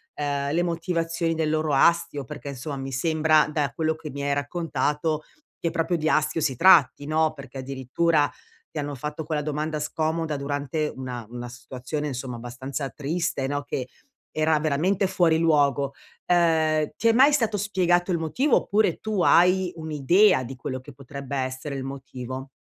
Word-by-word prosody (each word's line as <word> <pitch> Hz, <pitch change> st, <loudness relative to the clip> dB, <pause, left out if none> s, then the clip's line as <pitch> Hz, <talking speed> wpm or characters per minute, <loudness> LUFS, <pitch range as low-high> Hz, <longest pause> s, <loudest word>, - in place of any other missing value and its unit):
ehm, 145 Hz, 0 st, -1 dB
le 175 Hz, -, +2 dB
motivazioni 165 Hz, -1 st, -1 dB
del 160 Hz, -1 st, 0 dB
loro 155 Hz, -1 st, 0 dB
astio, 145 Hz, -1 st, +3 dB
perché 130 Hz, -, -9 dB
insomma 140 Hz, +1 st, -5 dB
mi 135 Hz, 0 st, -5 dB
sembra 155 Hz, +2 st, +3 dB
da 145 Hz, -4 st, 0 dB
quello 160 Hz, 0 st, +1 dB
che 155 Hz, -1 st, -8 dB
mi 140 Hz, +1 st, -5 dB
hai 140 Hz, 0 st, +1 dB
raccontato, 150 Hz, +1 st, -1 dB, 0.4 s
che 170 Hz, -, 0 dB
proprio 170 Hz, +1 st, 0 dB
di 155 Hz, -1 st, -1 dB
astio 155 Hz, +1 st, +1 dB
si 140 Hz, -4 st, 0 dB
tratti, 145 Hz, -3 st, +5 dB
no. 155 Hz, +1 st, +1 dB
Perché 140 Hz, -3 st, -10 dB
addirittura, 140 Hz, +4 st, 0 dB, 0.4 s
ti 155 Hz, -, -4 dB
hanno 145 Hz, 0 st, -3 dB
fatto 150 Hz, +4 st, -5 dB
quella 155 Hz, -1 st, -1 dB
domanda 150 Hz, +1 st, -2 dB
scomoda 155 Hz, 0 st, -1 dB
durante 145 Hz, +2 st, -2 dB
una 125 Hz, -3 st, -6 dB
una 120 Hz, 0 st, -7 dB
situazione 130 Hz, +4 st, -5 dB
insomma 130 Hz, -3 st, -5 dB
abbastanza 130 Hz, +4 st, -5 dB
triste, 150 Hz, 0 st, -2 dB
no, 145 Hz, +1 st, -2 dB
che, 130 Hz, -2 st, -4 dB, 0.4 s
era 155 Hz, 0 st, +2 dB
veramente 170 Hz, +6 st, +1 dB
fuori 175 Hz, -4 st, +3 dB
luogo. 145 Hz, -4 st, +2 dB, 0.3 s
Ehm, 160 Hz, -3 st, +2 dB
ti 230 Hz, -, +2 dB
è -, -, +7 dB
mai 265 Hz, +6 st, +6 dB
stato 225 Hz, -7 st, +1 dB
spiegato 185 Hz, -3 st, +1 dB
il -, -, +1 dB
motivo 235 Hz, -, +1 dB
oppure 215 Hz, +1 st, +1 dB
tu 215 Hz, -4 st, -1 dB
hai 180 Hz, +1 st, +4 dB
un'idea 160 Hz, +2 st, +3 dB
di 135 Hz, +3 st, -7 dB
quello 130 Hz, 0 st, -5 dB
che 130 Hz, +2 st, -13 dB
potrebbe 140 Hz, +1 st, -7 dB
essere 130 Hz, +2 st, -3 dB
il 135 Hz, -, -4 dB
motivo? 130 Hz, -1 st, -7 dB
150 Hz, 165 wpm, -25 LUFS, 140-165 Hz, 0.4 s, è